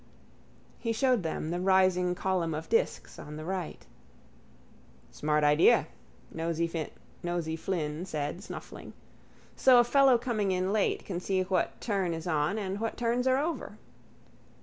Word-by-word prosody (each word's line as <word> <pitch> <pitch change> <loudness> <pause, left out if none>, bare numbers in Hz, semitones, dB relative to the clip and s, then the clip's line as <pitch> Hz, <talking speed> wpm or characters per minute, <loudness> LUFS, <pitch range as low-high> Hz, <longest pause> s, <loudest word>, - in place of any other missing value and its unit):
He 230 -1 -1
showed 250 -1 +2
them 160 -1 -3
the 175 - -2
rising 185 -1 +3
column 180 -4 -1
of 155 - -6
disks 465 +2 0
on 150 - -8
the 155 - -7
right. 185 -2 -4 1.3
—Smart 150 0 0
idea, 150 +2 +5 0.5
Nosey 165 0 -1 0.9
Flynn 160 -2 -3
said, 150 +1 -3
snuffling. - - -9 0.6
So 255 -2 +6
a - - +7
fellow 270 0 +5
coming 225 -5 -1
in 185 +2 0
late 215 -2 0
can 180 -3 -3
see 185 0 0
what 185 0 -1
turn 195 -6 -1
is 165 - -7
on 155 +3 0
and 195 -1 -3
what 225 +1 -3
turns 245 +1 0
are 260 0 +4
over. 320 +4 -3
185 Hz, 140 wpm, -29 LUFS, 165-225 Hz, 1.3 s, a